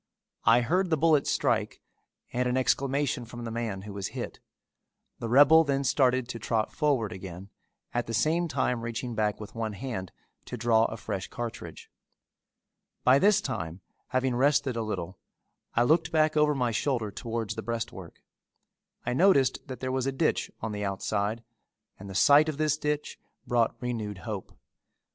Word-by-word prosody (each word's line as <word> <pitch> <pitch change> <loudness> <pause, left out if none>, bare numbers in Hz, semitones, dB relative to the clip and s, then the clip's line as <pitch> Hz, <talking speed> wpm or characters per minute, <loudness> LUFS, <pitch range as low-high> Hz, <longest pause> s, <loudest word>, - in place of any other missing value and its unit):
I 115 +2 +6
heard 180 +9 +1
the 160 - +2
bullet 155 -2 +3
strike - - 0 0.5
and 125 0 +1
an 125 - 0
exclamation 135 0 +1
from 120 +1 -9
the 115 - -4
man 110 -5 -3
who 105 -1 -8
was 100 -1 -3
hit. - - -5 0.8
The 115 - -4
rebel 145 +6 +7
then 140 -2 0
started 130 -2 +2
to 115 - -5
trot 110 0 -1
forward 140 -9 +1
again, 95 +1 -8 0.4
at 120 0 -1
the 115 - -4
same 160 +9 +2
time 125 -6 0
reaching 115 +1 -4
back 105 -1 0
with 105 - -9
one 110 -2 -3
hand 100 -5 -5 0.3
to 125 - -6
draw 115 -1 +3
a 110 - -4
fresh 105 -3 -4
cartridge. 120 -1 -7 1.1
By 130 +2 +6
this 210 +3 +4
time 85 - -4 0.3
having 130 0 0
rested 140 0 +2
a 115 - -1
little, 100 -4 -4 0.6
I 120 - +4
looked 160 +5 +2
back 155 -1 +3
over 150 -1 +3
my 125 -3 0
shoulder 115 -2 -1
towards 115 -1 -4
the - - -5
breastwork. 110 -6 -6 0.8
I 120 - 0
noticed 140 -4 +3
that 130 -2 -7
there 130 0 -2
was 130 0 -1
a - - +1
ditch 155 +4 0
on 110 - -3
the 105 0 -4
outside 100 +3 -2 0.6
and 100 +1 -9
the 95 - -8
sight 145 +8 +6
of 150 - -4
this 155 -1 +2
ditch 150 -1 -3 0.3
brought 120 -2 +1
renewed 110 -5 -3
hope. 105 -1 -7
120 Hz, 170 wpm, -28 LUFS, 110-140 Hz, 1.1 s, rebel